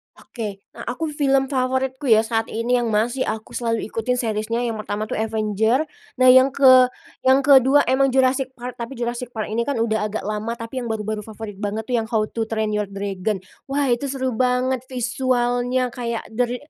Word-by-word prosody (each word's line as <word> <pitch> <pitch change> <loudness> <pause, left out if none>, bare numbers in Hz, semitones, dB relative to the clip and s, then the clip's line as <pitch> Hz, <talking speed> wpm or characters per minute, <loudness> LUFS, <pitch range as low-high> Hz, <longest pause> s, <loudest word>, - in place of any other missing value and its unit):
Oke, 205 -4 -7
nah, - - -10
aku 300 +6 -3
film 275 -2 +1
favoritku 260 +1 -1
ya 220 -3 +6
saat 225 0 -1
ini 235 +2 0
yang 240 - -1
masih 230 +4 0
aku 220 0 -4
selalu 230 -2 -1
ikutin 230 +3 -1
series-nya, 230 -1 -1
yang 230 -2 -2
pertama 215 0 -4
tuh - - -2
Avenger. 220 +3 +1 0.3
Nah, 255 0 +6
yang 260 +1 +6
ke 255 -2 +7 0.4
yang 265 +1 +5
kedua 270 +1 +6
memang 265 0 +2
Jurassic 260 0 +2
Park, 250 0 -8
tapi 235 +3 -5
Jurassic 240 +1 -4
Park 215 -2 -3
ini 235 +3 -1
kan 285 - -1
udah 220 -2 0
agak 215 +1 -4
lama. 215 +2 -3
Tapi 230 +2 -6
yang 245 - -4
baru-baru 215 -1 -3
favorit 215 -2 -8
banget 210 +1 -3
tuh 245 - 0
yang 225 - -2
How 220 -2 0
to 225 -1 -2
Train 220 -1 -1
Your 210 -1 -1
Dragon. 195 0 -3 0.2
Wah, 275 -1 0
itu 240 +4 0
seru 260 -1 -2
banget, 255 0 +1
visualnya 245 0 0
kayak 235 -1 -4
the 245 +3 +1
re 245 +1 -3
240 Hz, 195 wpm, -22 LUFS, 220-260 Hz, 0.4 s, ke